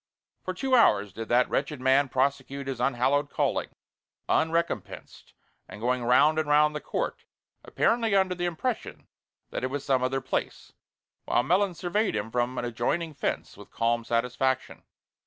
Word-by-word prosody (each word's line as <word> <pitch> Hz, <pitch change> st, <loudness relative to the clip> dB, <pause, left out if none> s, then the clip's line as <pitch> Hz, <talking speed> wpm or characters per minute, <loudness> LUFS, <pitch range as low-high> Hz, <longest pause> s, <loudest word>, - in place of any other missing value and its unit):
For 185 Hz, -, -4 dB
two 265 Hz, +7 st, -2 dB
hours 105 Hz, -, +4 dB
did 115 Hz, +2 st, -7 dB
that 125 Hz, +1 st, +4 dB
wretched 150 Hz, -3 st, -2 dB
man 130 Hz, +2 st, +3 dB
prosecute 140 Hz, +1 st, -1 dB
his 135 Hz, -2 st, -4 dB
unhallowed 135 Hz, +3 st, +1 dB
calling, -, -, -1 dB, 0.6 s
unrecompensed, 165 Hz, +1 st, -2 dB, 0.4 s
and 105 Hz, -, -9 dB
going 125 Hz, +2 st, 0 dB
round 150 Hz, +6 st, +4 dB
and 155 Hz, -2 st, -2 dB
round 150 Hz, +1 st, +4 dB
the 150 Hz, -, -3 dB
court, -, -, -4 dB, 0.4 s
apparently 225 Hz, -3 st, +1 dB
under 190 Hz, -1 st, +3 dB
the 175 Hz, 0 st, -3 dB
impression 215 Hz, +8 st, -4 dB, 0.4 s
that -, -, -4 dB
it -, -, +1 dB
was 140 Hz, +1 st, -4 dB
some 130 Hz, -2 st, +2 dB
other 130 Hz, +1 st, 0 dB
place, 130 Hz, 0 st, -4 dB, 0.5 s
while 120 Hz, -, +2 dB
Melons 180 Hz, +4 st, +1 dB
surveyed 200 Hz, -, 0 dB
him 105 Hz, +2 st, -3 dB
from 125 Hz, +1 st, -1 dB
an 120 Hz, -, -2 dB
adjoining 135 Hz, +8 st, -2 dB
fence 140 Hz, -, -3 dB
with -, -, -13 dB
calm 115 Hz, 0 st, 0 dB
satisfaction. 125 Hz, +3 st, -1 dB
135 Hz, 155 wpm, -27 LUFS, 125-170 Hz, 0.6 s, hours